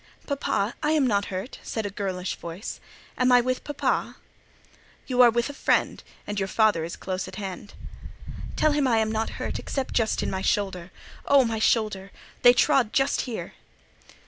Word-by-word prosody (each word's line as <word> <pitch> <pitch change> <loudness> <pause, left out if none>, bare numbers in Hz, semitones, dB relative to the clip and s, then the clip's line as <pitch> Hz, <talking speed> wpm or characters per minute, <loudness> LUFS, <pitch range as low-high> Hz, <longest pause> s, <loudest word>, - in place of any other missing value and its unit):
"Papa, 245 -6 -1
I 305 0 +1
am 300 -4 +3
not 205 -4 +1
hurt," 190 +5 -6
said 220 -2 -4
a 205 - -3
girlish 190 -2 -3
voice; 170 +5 -7 0.4
"am 255 0 +4
I 245 - +7
with 255 +1 -1
papa?" 290 -1 -1 0.9
"You 255 -1 +2
are 245 - +8
with 235 +1 0
a 285 - -7
friend, - - +1 0.2
and 205 -1 -3
your 195 - -1
father 215 -5 +2
is 170 - -5
close 185 0 -4
at - - -9
hand." 195 0 -7 0.8
"Tell 310 - +3
him 290 -2 +2
I 235 -3 +3
am 220 0 +1
not 220 0 -2
hurt, - - -3
except 270 -2 -4
just 225 -2 +1
in - - -2
my 190 - -2
shoulder. 190 -3 -1 0.4
Oh, 275 -2 +6
my 225 -1 -2
shoulder! 210 -4 +1 0.3
They 245 - +8
trod 255 -3 +3
just 270 +1 +2
here." 230 - -5
220 Hz, 180 wpm, -25 LUFS, 195-255 Hz, 0.9 s, are